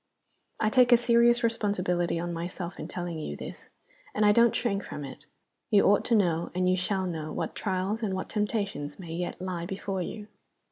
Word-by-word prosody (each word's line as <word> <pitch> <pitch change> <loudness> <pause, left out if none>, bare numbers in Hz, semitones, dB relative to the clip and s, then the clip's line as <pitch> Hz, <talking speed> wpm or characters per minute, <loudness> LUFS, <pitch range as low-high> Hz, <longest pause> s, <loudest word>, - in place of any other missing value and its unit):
I 215 - +2
take 250 +1 +5
a 240 - +9
serious 235 0 +4
responsibility 180 -7 0
on 175 0 -3
myself 175 +1 -5
in - - -5
telling 175 -2 -4
you 155 - -5
this - - -9 0.5
and 210 - +3
I 205 - +7
don't 235 +2 +5
shrink 200 -5 0
from 145 - -6
it. 145 +2 -11 0.4
You 205 -3 +5
ought 205 +1 +4
to 235 - +3
know, 170 -5 +2
and 180 0 +1
you 185 - +4
shall 190 +1 -1
know, 160 -3 -4
what - - -3
trials 195 +3 -2
and 200 -4 -1
what 185 - -4
temptations 205 -9 -2
may 170 -4 -8
yet 175 +1 -4
lie 180 -2 -4
before 195 0 -3
you." 210 +4 -5
190 Hz, 195 wpm, -28 LUFS, 175-215 Hz, 0.5 s, a